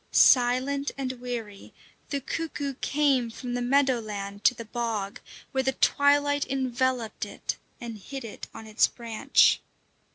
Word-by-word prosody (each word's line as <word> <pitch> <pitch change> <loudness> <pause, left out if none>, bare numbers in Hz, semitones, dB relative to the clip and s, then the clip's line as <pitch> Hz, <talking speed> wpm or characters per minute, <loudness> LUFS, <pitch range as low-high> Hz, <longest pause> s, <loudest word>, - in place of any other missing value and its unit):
Silent 260 +3 +4
and 265 -2 -2
weary, 230 -5 -6 0.3
the 280 - -1
cuckoo 285 0 -3
came 275 -5 +2
from 245 +2 -6
the 245 - -1
meadow 265 0 +3
land 200 -2 -6
to 250 - +5
the 230 - -7
bog, 220 -3 -3 0.3
where 265 - +1
the 265 0 0
twilight 285 +1 +3
enveloped 260 -3 -1
it - - -4 0.2
and 230 -3 -7
hid 265 +5 -7
it 220 - -8
on 225 - -10
its 215 0 +3
branch. 230 -2 +3
250 Hz, 140 wpm, -27 LUFS, 230-275 Hz, 0.3 s, to